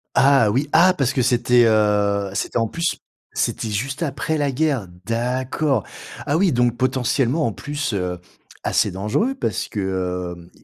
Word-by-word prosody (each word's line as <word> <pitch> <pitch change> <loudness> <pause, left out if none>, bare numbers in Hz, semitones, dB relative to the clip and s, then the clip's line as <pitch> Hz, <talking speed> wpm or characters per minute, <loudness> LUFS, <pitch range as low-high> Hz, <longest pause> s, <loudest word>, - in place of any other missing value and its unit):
Ah 135 -6 +5
oui! 135 +7 0
Ah! 180 +3 +6
parce 135 -1 +1
que 130 - +1
c'était, 120 -1 +4
heu, 105 -2 +2
c'était 110 - -2
en 115 -1 +1
plus, 170 +7 -2 0.4
c'était 115 - -1
juste 130 +9 -3
après 150 +2 -2
la 145 -2 0
guerre. 135 -6 0 0.2
D'accord, 125 +2 0 0.4
ah 145 - +1
oui, 185 0 +3
donc 120 -1 +1
potentiellement 130 +3 +1
en 115 - 0
plus, 145 -3 -4
heu, 90 -2 -2 0.4
assez - - +1
dangereux 105 - -1
parce - - -2
que, 90 -3 -3
hem, 85 0 -15
125 Hz, 160 wpm, -21 LUFS, 105-145 Hz, 0.4 s, Ah